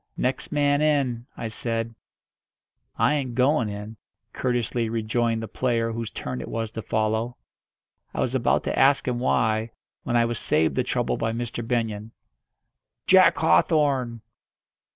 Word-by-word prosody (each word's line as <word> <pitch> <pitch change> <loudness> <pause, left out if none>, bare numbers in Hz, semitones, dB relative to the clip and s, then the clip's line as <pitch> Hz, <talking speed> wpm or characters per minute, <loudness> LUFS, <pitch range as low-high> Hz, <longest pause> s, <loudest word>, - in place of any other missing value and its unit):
"Next 130 +1 -2
man 145 -1 +2
in," 135 -6 +1
I 115 - -4
said. 115 +1 -3 1.0
"I - - +3
ain't 130 -5 -2
going 130 -2 +2
in," 105 +2 -7 0.4
courteously 120 -2 -1
rejoined 115 0 0
the - - -4
player 115 +3 0
whose 115 -1 -4
turn 125 - -5
it - - -7
was 115 -1 -3
to 110 - -5
follow. 110 +3 -1 0.7
I - - -6
was - - 0
about - - +2
to - - -1
ask 135 0 +4
him 120 -1 0
why, 110 -3 +1 0.3
when 120 - 0
I 115 - +4
was 115 -2 -3
saved 80 -1 +2
the - - +1
trouble 60 -1 -1
by 115 0 -1
Mr. 120 0 -4
Benyon. 115 -2 -2 0.9
"Jack - - +6
Hawthorn!" 125 - +2
115 Hz, 150 wpm, -25 LUFS, 110-125 Hz, 1.0 s, Jack